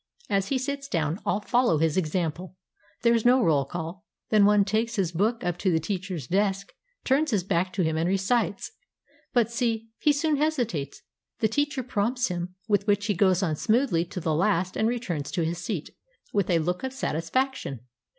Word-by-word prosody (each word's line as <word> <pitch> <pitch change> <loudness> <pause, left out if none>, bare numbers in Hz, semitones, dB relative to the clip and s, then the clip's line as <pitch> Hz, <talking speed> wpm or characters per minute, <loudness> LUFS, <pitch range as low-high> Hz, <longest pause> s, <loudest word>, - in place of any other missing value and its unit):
As 195 -1 +1
he 275 - +1
sits 275 +1 -3
down, 165 - -1
all 205 - +1
fol 245 +4 +2
low 160 - +3
his 160 0 +1
example. 180 +1 -2 0.5
There 235 0 +5
is 230 -2 +2
no 250 +1 +5
roll 145 -6 +3
call. 170 +4 -6 0.3
Then 210 -2 +6
one 205 -1 +5
takes 220 +3 0
his 190 -6 0
book 215 +7 0
up 175 -1 -2
to 190 - +1
the 160 - +2
teacher's 185 - -4
desk, 195 +3 0 0.3
turns 290 +4 +2
his 205 -7 +1
back 180 0 0
to 185 - 0
him 160 -1 0
and 165 +2 +1
recites. 195 +2 0 0.6
But 235 -3 +2
see, 225 -2 -1
he 300 - +4
soon 295 +1 +1
hesitates; 245 - -1 0.3
the 220 - +2
teacher 280 +3 -1
prompts 240 +1 0
him, 180 0 -4
with 205 -1 +1
which 205 0 +2
he 210 - +1
goes 190 0 +3
on 160 -4 0
smoothly 220 - +2
to 180 - -6
the 160 -2 -1
last 185 +2 +1
and 220 - +1
returns 185 - -3
to 170 -3 0
his 170 +1 -2
seat 175 -3 -4 0.4
with 200 -3 +1
a 175 - +4
look 180 +5 -1
of 260 0 -3
satisfaction. 165 - -2
200 Hz, 195 wpm, -26 LUFS, 170-235 Hz, 0.6 s, Then